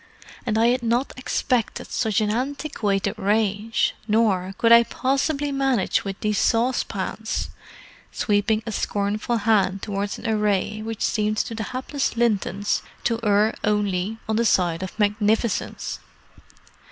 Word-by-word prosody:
"And 220 -1 +1
I 230 +1 +4
had 250 +1 +1
not 240 +3 0
expected 250 -2 -1
such 220 -3 +1
an 210 -1 +1
antiquated 235 -5 -1
range. 210 +1 +1
Nor 200 -4 +1
could 230 - +3
I 235 0 +10
possibly 275 +4 -1
manage 270 -6 +1
with 195 -1 -5
these 210 -1 0
saucepans"—sweeping 220 -2 -1
a 225 - -4
scornful 205 +3 -1
hand 200 -3 +2
towards 200 -1 -3
an - - -6
array 210 -1 0
which 225 0 -4
seemed 215 -1 0
to 225 - -1
the 220 -1 -4
hapless 260 +1 -3
Lintons 205 -3 +1 0.2
to 230 -1 0
err 210 0 +3
only 210 -1 0
on 220 0 0
the 235 - +2
side 175 -5 +2
of 190 +2 -6
magnificence. 210 +2 0
215 Hz, 130 wpm, -23 LUFS, 205-235 Hz, 0.2 s, I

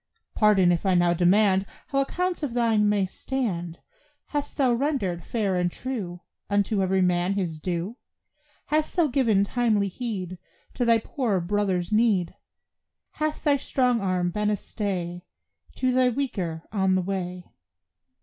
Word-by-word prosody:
Pardon 200 -5 +4
if 170 - 0
I 190 -2 +2
now 175 -1 +4
demand 190 +2 +3 0.2
How 275 - +1
accounts 360 +6 -2
of 270 -6 -3
thine 225 -3 +3
may 205 -2 +2
stand; 185 -7 -3 0.5
Hast 290 -1 -3
thou 260 -4 +3
rendered, 235 - -1
fair 205 -3 -1
and 175 0 +1
true, 195 -10 -5 0.3
Unto 205 0 +1
every 190 0 +2
man 180 +1 +1
his 175 -6 -2
due? 180 +7 -3 0.7
Hast 305 0 0
thou 345 -2 +4
given 240 -8 +2
timely 215 -2 +1
heed 185 -5 -5 0.3
To 245 - -1
thy 230 -1 +5
poorer 225 -3 -1
brother's 185 0 -1
need? 215 -5 +2 0.8
Hath 310 0 -3
thy 290 -2 +3
strong 250 -4 +1
arm 180 -2 0
been 210 +2 0
a 210 - +1
stay 180 -5 -4 0.5
To 255 -1 +1
the 255 0 +3
weaker 190 -11 -3
on 190 -3 +2
the 185 - +1
way? 180 -1 -4
200 Hz, 150 wpm, -25 LUFS, 180-245 Hz, 0.8 s, thy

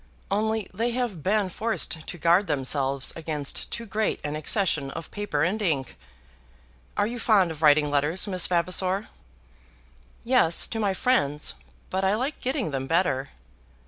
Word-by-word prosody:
Only 220 +1 0
they 230 +5 0
have 240 -9 -2
been 200 +3 +1
forced 200 -6 -3
to 175 - -6
guard 170 +4 +3
themselves 135 -1 0
against 155 -3 -2
too 235 - -5
great 215 0 -1
an 150 0 -3
accession 155 -2 +1
of 165 +3 -7
paper 205 -8 -1
and 200 +6 0
ink. 145 - -1 1.0
Are - - +3
you 240 +3 -4
fond 200 -7 +3
of 155 -1 -8
writing 150 -1 +5
letters, 150 +7 +2
Miss 185 -4 +1
Vavasor?" 185 +3 0 1.1
"Yes, 235 -9 +3
to 225 - -4
my 200 -3 +1
friends; 150 - +1 0.4
but 190 +1 -1
I 190 +2 +3
like 260 +6 -2
getting 255 - -1
them 135 -1 -3
better." 155 -5 +1
185 Hz, 150 wpm, -26 LUFS, 150-215 Hz, 1.1 s, writing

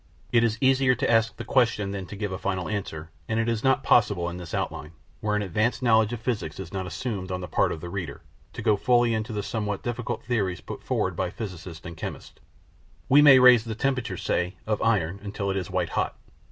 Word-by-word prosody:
It 115 -1 +4
is 115 -1 +1
easier 130 -1 +4
to - - -1
ask 115 0 +2
the - - -6
question 115 -6 +2
than 95 -2 -5
to 100 - -8
give 105 -1 -3
a 95 - -4
final 95 -4 -2
answer, 80 -6 -5 0.2
and 110 0 0
it 115 - 0
is 115 -2 -1
not 135 0 +3
possible 100 -7 +3
in 90 - -7
this 85 -3 -8
OUTLINE, 75 +1 -4 0.3
where 105 -2 -1
an 105 - 0
advanced 105 +7 0
knowledge 110 -2 +4
of 120 - -4
physics 110 -10 -3
is 95 - -7
not 95 -1 -3
assumed 95 +1 -4
on 90 - -2
the 90 - -5
part - - +1
of 80 - -5
the 90 - -6
reader, 90 -1 -5 0.3
to - - -6
go 105 - +4
fully 120 +2 +3
into 110 +1 -2
the 105 -2 -3
somewhat 105 -3 -3
difficult 120 -1 -3
theories 100 -7 -1
put - - -8
forward - - -1
by - - -1
physicists 90 -5 -8
and 85 -1 -8
chemists. - - -7 0.7
We 145 +3 +7
may 140 -3 +9
raise 125 -3 +7
the 110 -1 -5
temperature, 130 -6 -1
say, 90 +3 -1
of 110 -1 -1
iron, 100 -5 +1
until 100 -1 -3
it - - -2
is 90 - -3
white 90 -2 -1
hot. - - -2
105 Hz, 230 wpm, -26 LUFS, 95-115 Hz, 0.7 s, may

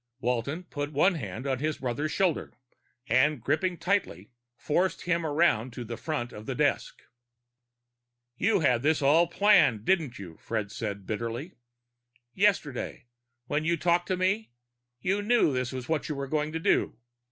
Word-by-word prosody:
Walton 125 +7 -1
put 145 -4 -5
one 165 +7 +3
hand 115 - -6
on 135 -2 -1
his 155 +1 -1
brother's 135 +5 -2
shoulder 185 -5 0 0.5
and, 140 +2 +3
gripping 170 - 0
tightly, 165 - -1 0.3
forced 180 +5 0
him 170 -1 0
around 145 -6 +2
to 125 - -6
the 120 0 -6
front 125 -3 -4
of 105 +1 -10
the - - -2
desk. - - 0 1.3
"You 200 - +2
had 125 -5 +3
this 150 +1 +2
all 160 +5 +5
planned, 170 - +4
didn't 160 -10 +1
you?" 90 -5 -10
Fred 105 -3 -3
said 100 -3 -5
bitterly. 115 - -4 0.8
"Yesterday, 170 -11 0 0.4
when 145 +4 -1
you 170 +1 +1
talked 175 +2 +1
to 185 - 0
me, 195 +4 0 0.5
you 195 +3 0
knew 215 - +3
this 125 -1 -1
was 130 -1 -6
what 160 -1 -1
you 150 - -2
were 140 0 -3
going 150 +1 -1
to 165 - -2
do. - - +1
150 Hz, 160 wpm, -28 LUFS, 120-175 Hz, 1.3 s, all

